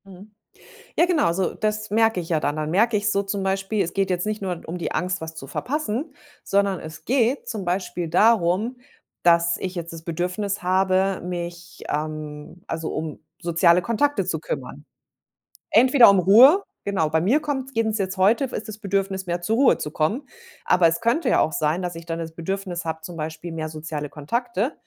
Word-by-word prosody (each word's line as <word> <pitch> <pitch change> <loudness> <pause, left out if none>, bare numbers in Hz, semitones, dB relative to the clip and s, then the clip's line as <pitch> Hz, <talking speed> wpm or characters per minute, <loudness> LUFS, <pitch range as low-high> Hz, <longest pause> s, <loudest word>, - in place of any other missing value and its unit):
Mhm. 195 +2 -14 0.7
Ja - - +5
genau, 315 - +2
so 185 +1 -1
das 215 0 -2
merke 225 -2 +3
ich 165 - -8
ja 160 -2 +2
dann. 145 0 -1
Dann 155 0 -2
merke 215 +6 +3
ich 210 +1 +1
so 200 -1 +1
zum 195 0 -3
Beispiel, 195 +2 0
es 175 - -5
geht 195 -1 0
jetzt 180 -1 0
nicht 215 0 -2
nur 180 -3 -3
um 170 +3 -5
die 170 - -3
Angst, 180 0 -1
was 160 0 -7
zu 150 -4 -8
verpassen, 275 - -3 0.3
sondern 200 -1 +1
es 160 0 -10
geht 250 - +1
zum 215 -5 -4
Beispiel 175 -1 -2
darum, 210 +4 +3 0.5
dass 170 0 +4
ich 185 0 -4
jetzt 170 -2 -5
das 165 -1 -9
Bedürfnis 180 +5 -3
habe, 190 +1 +2
mich 175 0 -6
ähm, 155 +2 -5
also 160 -1 -4
um 155 -1 -5 0.2
soziale 170 0 +3
Kontakte 285 +9 +1
zu - - -2
kümmern. - - -6 0.9
Entweder 255 +1 +7
um 200 - +4
Ruhe 250 - +7 0.2
genau. 185 -6 0
Bei 160 +1 +2
mir 230 - +3
kommt's 270 -3 -3
eben 225 -1 +1
jetzt 195 -2 -2
heute 210 +8 +3
ist 220 -4 -6
das 210 -1 -7
Bedürfnis, 195 -2 -2
mehr 175 0 -2
zur 220 +6 0
Ruhe 270 +2 +4
zu 150 - -4
kommen. 205 - -1 0.4
Aber 180 -2 +4
es 165 - -1
könnte 235 +8 +1
ja - - +4
auch 160 - +1
sein, 160 +2 0
dass 175 -1 -3
ich 165 0 -10
dann 165 -1 -3
das 165 -1 -5
Bedürfnis 180 +1 -4
habe, 160 0 -4
zum 170 +1 -8
Beispiel 160 +2 -5
mehr 160 -1 -4
soziale 155 -1 -5
Kontakte. 235 - -2
185 Hz, 195 wpm, -23 LUFS, 165-215 Hz, 0.9 s, Entweder